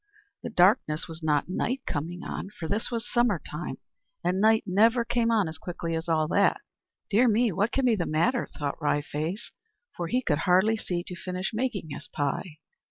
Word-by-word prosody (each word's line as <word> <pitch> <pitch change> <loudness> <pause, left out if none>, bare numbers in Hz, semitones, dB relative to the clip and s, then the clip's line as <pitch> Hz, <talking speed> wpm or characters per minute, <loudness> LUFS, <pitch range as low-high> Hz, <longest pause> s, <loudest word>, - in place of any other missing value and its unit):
The - - -5
darkness 180 -6 +3
was 165 0 -8
not 150 -2 +1
night 255 +8 -2
coming 170 +5 -4
on, - - -5
for 170 -5 -7
this 205 +5 -1
was 235 -1 -3
summer 240 -6 +2
time 150 +4 -5 0.5
and 185 +2 +1
night 220 +1 +5
never 225 +5 +3
came 235 -1 +1
on 215 -5 +3
as 160 0 -7
quickly 170 -1 -4
as 165 +1 -4
all 155 -1 +2
that. 200 +2 +3 0.5
"Dear 235 +5 +5
me, 230 +1 +3
what 200 +6 0
can 270 - +1
be 235 -3 +4
the 175 -5 -2
matter?" 225 +12 +1
thought 145 +1 -3
Wry 145 -1 +2
Face; 160 +9 -4 0.4
for 175 - -3
he 250 +7 0
could 150 -7 +1
hardly 185 +6 +4
see 175 -5 -3
to 180 - -7
finish 185 +2 -4
making 220 - -2
his 140 - -7
pie. 145 +3 -3
185 Hz, 195 wpm, -27 LUFS, 160-225 Hz, 0.5 s, night